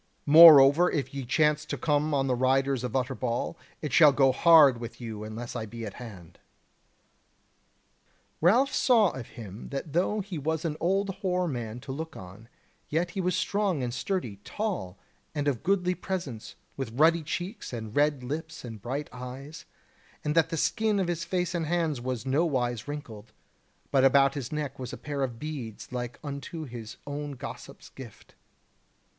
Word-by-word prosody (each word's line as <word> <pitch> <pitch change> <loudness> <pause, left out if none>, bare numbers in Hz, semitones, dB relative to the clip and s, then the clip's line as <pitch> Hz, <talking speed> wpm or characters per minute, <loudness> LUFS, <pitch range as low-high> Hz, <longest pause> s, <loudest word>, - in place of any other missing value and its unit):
Moreover 155 +1 +9
if 140 -2 -2
ye 140 -1 -4
chance 150 +3 +2
to - - -4
come 150 0 +1
on 135 -2 +1
the 130 - +1
riders 130 +1 +1
of 125 0 -4
Utterbol, 125 0 -2 0.3
it 150 -3 -3
shall 150 -1 +8
go 135 -1 +4
hard 150 -5 +6
with 115 -1 -8
you 110 -3 -6
unless 115 +3 -7
I 110 -2 -4
be 115 +1 -7
at 100 - -7
hand." 95 -9 -11 2.0
Ralph 240 - +4
saw 225 -7 +4
of 125 -3 -8
him 105 -2 -9
that 140 +1 -5
though 190 +5 +1
he 185 -5 -6
was 160 +3 -2
an 155 -2 -1
old 195 +3 +1
hoar 180 -2 0
man 120 -5 -4
to 135 - -7
look 160 +4 -6
on, 95 +5 -12 0.4
yet 170 +3 0
he 190 - -3
was 180 0 0
strong 190 -5 0
and 120 -1 -3
sturdy, 130 - -3
tall, 185 - -4 0.4
and 145 -1 -1
of 135 -5 0
goodly 180 0 +1
presence, 170 - -5 0.2
with 130 -5 -5
ruddy 165 +2 +5
cheeks, 180 +7 -5
and 110 -3 -6
red 145 -2 +2
lips 155 +2 -5
and 110 -4 -8
bright 135 +6 -4
eyes, 135 +6 -8 0.6
and 150 - 0
that 165 0 +3
the 165 - -3
skin 215 +5 +1
of 185 -2 0
his 170 -1 -2
face 180 -1 -1
and 165 -3 -2
hands 160 -6 0
was 125 -1 -4
nowise 130 -5 0
wrinkled: 125 -7 -8 0.6
but 135 -2 +4
about 135 0 +5
his 140 -5 -5
neck 150 -3 -4
was 125 -1 -5
a - - -7
pair 145 -2 -4
of 125 -4 -2
beads 130 -8 -7
like 125 -1 -5
unto 145 +3 -6
his 115 -3 -9
own 145 0 -5
gossip's 130 - -9
gift. - - -13
145 Hz, 175 wpm, -28 LUFS, 125-165 Hz, 2.0 s, Moreover